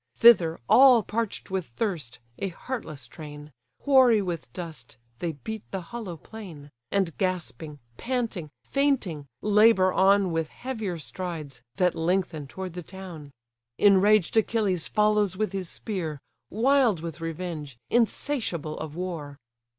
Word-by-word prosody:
Thither, 180 -9 +6
all 255 -4 +7
parch'd 220 -2 -3
with 190 -3 -2
thirst, 145 - -3 0.2
a 195 - -1
heartless 165 - -6
train, 150 +3 -10 0.3
Hoary 260 -5 +6
with 175 - -4
dust, 150 -7 -8 0.2
they 170 -2 -2
beat 220 +9 -6
the 195 - -3
hollow 185 -1 -7
plain: 160 -7 -11 0.2
And 190 -5 0
gasping, 170 -5 -2 0.2
panting, 230 -10 -2
fainting, 235 - 0 0.2
labour 210 -3 +5
on 195 -1 +4
With 165 -1 -1
heavier 220 -9 -4
strides, 160 -4 -6
that 180 -2 +2
lengthen 165 -3 -1
toward 185 +4 -6
the 180 - -5
town. 175 -5 -9 0.5
Enraged 205 -1 +5
Achilles 210 -6 +1
follows 210 -3 +2
with 215 -2 0
his 190 -3 -3
spear; 165 -9 -4 0.3
Wild 240 - +3
with 165 -1 -6
revenge, 165 -5 -5
insatiable 230 - 0
of 155 -1 -6
war. 165 -6 -5
185 Hz, 125 wpm, -27 LUFS, 160-215 Hz, 0.5 s, all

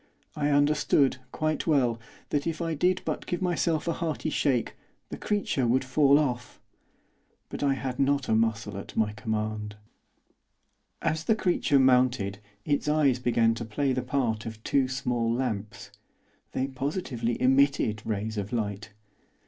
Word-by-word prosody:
I 145 -1 0
understood, 145 -2 +3
quite 155 +1 -1
well, 125 -7 +2 0.3
that 145 +2 -1
if 165 - -2
I 165 -1 -1
did 180 +4 +1
but - - -3
give 175 - -2
myself 170 -3 0
a 170 - +1
hearty 155 -4 -3
shake, 130 -7 0 0.4
the - - -5
creature 200 - 0
would 130 +3 +2
fall 140 +1 +4
off; 125 -5 -2 0.9
but - - -6
I 140 -1 +2
had 130 0 -4
not 140 -1 +2
a - - +1
muscle 110 -2 0
at - - -10
my 105 -1 +1
command. 110 -1 -3 1.3
As 160 +1 -1
the 220 - +3
creature 175 -7 +2
mounted 125 -6 +3 0.3
its 145 0 0
eyes 145 -5 +3
began 115 -2 +2
to 115 - -5
play 130 +5 -1
the 130 - -1
part 125 -4 -1
of 110 -1 -8
two 135 -2 +2
small 125 -3 -1
lamps; 115 -4 -3 0.6
they 130 - 0
positively 135 -3 -3
emitted 130 -4 +3
rays 110 0 -3
of 100 +2 -5
light. 105 -2 -3
130 Hz, 150 wpm, -27 LUFS, 115-145 Hz, 1.3 s, fall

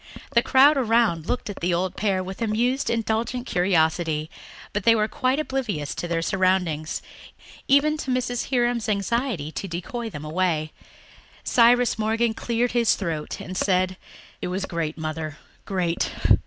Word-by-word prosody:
The 235 - +4
crowd 275 +4 +5
around 225 - +2
looked 250 - -2
at 205 - -6
the 175 0 +1
old 180 +1 -1
pair 195 -3 0
with 190 +4 -8
amused, 240 +5 +1
indulgent 230 +2 -1
curiosity, 160 -5 +1 0.4
but 205 - -1
they 230 +2 +6
were 215 -1 +2
quite 255 +4 0
oblivious 235 - -2
to 175 - -4
their 165 -1 -1
surroundings, 180 -4 0 0.6
even 295 +3 +4
to 275 - -5
Mrs. 250 -1 -1
Hiram's 240 -3 +1
anxiety 205 - -1
to 195 - -5
decoy 210 +7 -4
them 150 -6 -8
away. 155 -1 0 0.7
Cyrus 240 -1 +4
Morgan 225 +1 +1
cleared 235 +2 -1
his 235 -2 +3
throat 165 -6 -4
and 185 - -7
said, 185 -1 +1 0.5
"It - - -2
was 190 +2 -2
great, 165 -3 -3
Mother, 155 -1 -4 0.3
great. 180 -3 -1
200 Hz, 150 wpm, -24 LUFS, 170-240 Hz, 0.7 s, they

